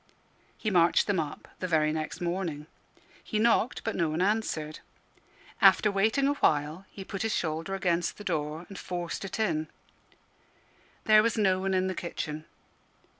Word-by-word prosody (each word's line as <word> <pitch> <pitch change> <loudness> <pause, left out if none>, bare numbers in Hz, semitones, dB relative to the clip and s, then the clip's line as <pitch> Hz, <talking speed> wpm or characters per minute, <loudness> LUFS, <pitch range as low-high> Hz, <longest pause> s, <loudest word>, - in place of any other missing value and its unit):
He 215 - -2
marched 170 -2 +4
them 200 -4 +1
up 150 -2 -5
the 185 - -2
very 155 -3 +2
next 155 +1 -4
morning. 170 -4 -2 0.6
He 215 - -3
knocked, 230 +2 +2
but 225 - -2
no 170 -3 +1
one 155 +2 -2
answered. 185 -6 -1 0.8
After 210 - +6
waiting 220 +8 +2
a 285 - +3
while, 155 - 0
he 195 - -9
put 195 0 -5
his 225 0 0
shoulder 165 +3 -2
against 175 -2 0
the 205 - -9
door, 160 -2 -2
and 195 - -9
forced 175 0 -4
it 195 - -5
in. 160 -7 0 1.4
There 215 -1 +7
was 230 +1 0
no 190 -3 +3
one 190 0 0
in 185 0 +2
the 190 - -1
kitchen. 155 -3 -5
185 Hz, 165 wpm, -29 LUFS, 160-205 Hz, 1.4 s, There